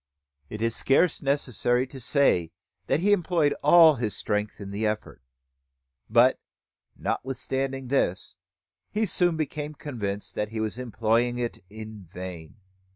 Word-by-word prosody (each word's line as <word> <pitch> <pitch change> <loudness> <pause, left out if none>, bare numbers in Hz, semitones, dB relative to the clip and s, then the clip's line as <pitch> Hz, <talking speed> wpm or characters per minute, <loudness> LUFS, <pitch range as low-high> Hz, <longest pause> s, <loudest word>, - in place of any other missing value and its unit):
It 105 +1 -5
is 115 -1 0
scarce 150 +5 +2
necessary 130 -3 +1
to 135 +1 -11
say 115 - +2 0.4
that 155 - +1
he 205 +3 +3
employed 170 -6 +2
all 160 +1 +8
his 110 -5 -2
strength 105 0 -2
in 100 -1 -7
the 100 +2 -3
effort; 105 -8 -4 0.9
but, 120 +3 +5 0.6
notwithstanding 135 0 -2
this, 125 -9 0 0.5
he 215 +1 0
soon 175 -3 +2
became 150 0 -4
convinced 105 -9 -4
that 105 - -2
he 110 0 -5
was 110 +2 -2
employing 120 0 +1
it 120 -1 -3
in 110 -1 -9
vain. 90 -2 -9
120 Hz, 135 wpm, -26 LUFS, 105-145 Hz, 0.9 s, all